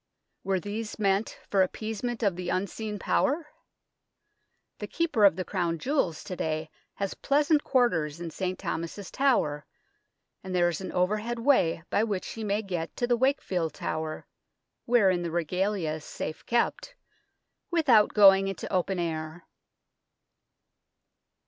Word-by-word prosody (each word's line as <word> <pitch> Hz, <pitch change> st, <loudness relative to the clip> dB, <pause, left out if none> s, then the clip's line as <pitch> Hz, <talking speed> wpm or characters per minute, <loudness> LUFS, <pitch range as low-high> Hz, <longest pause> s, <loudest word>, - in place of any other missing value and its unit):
Were 195 Hz, -1 st, 0 dB
these 210 Hz, +4 st, -5 dB
meant 200 Hz, 0 st, 0 dB
for 195 Hz, -, +2 dB
appeasement 225 Hz, +5 st, -2 dB
of 200 Hz, -4 st, +2 dB
the 180 Hz, 0 st, -4 dB
unseen 210 Hz, +3 st, -2 dB
power? 290 Hz, -, 0 dB, 1.3 s
The -, -, -5 dB
Keeper 315 Hz, -, +2 dB
of 195 Hz, -, +6 dB
the 185 Hz, 0 st, -3 dB
Crown 175 Hz, -4 st, -1 dB
Jewels 220 Hz, -, -1 dB
to 180 Hz, -, -6 dB
day 155 Hz, -1 st, -3 dB, 0.2 s
has 195 Hz, -1 st, -2 dB
pleasant 295 Hz, +1 st, +2 dB
quarters 170 Hz, -, +1 dB
in 170 Hz, -1 st, -5 dB
St. 185 Hz, +2 st, -3 dB
Thomas's 170 Hz, +2 st, -5 dB
Tower, 155 Hz, -, +1 dB, 0.8 s
and 185 Hz, -1 st, -4 dB
there 175 Hz, -1 st, +4 dB
is 175 Hz, -, -4 dB
an 190 Hz, -, -5 dB
overhead 210 Hz, +6 st, 0 dB
way 230 Hz, -, +2 dB
by 210 Hz, -, +3 dB
which 205 Hz, -4 st, -2 dB
he 225 Hz, -, -6 dB
may 210 Hz, +1 st, 0 dB
get 175 Hz, -5 st, -4 dB
to 245 Hz, -, +1 dB
the 240 Hz, 0 st, +2 dB
Wakefield 195 Hz, -, 0 dB
Tower, 155 Hz, 0 st, -4 dB, 0.6 s
wherein 195 Hz, -7 st, +3 dB
the 170 Hz, -, -3 dB
Regalia 180 Hz, +1 st, -1 dB
is 155 Hz, -1 st, -7 dB
safe 155 Hz, -, -6 dB
kept, -, -, 0 dB, 0.7 s
without 270 Hz, -11 st, +4 dB
going 195 Hz, -2 st, +7 dB
into 195 Hz, 0 st, -5 dB
open 185 Hz, +1 st, +1 dB
air. 160 Hz, -1 st, -4 dB
195 Hz, 140 wpm, -28 LUFS, 175-230 Hz, 1.3 s, going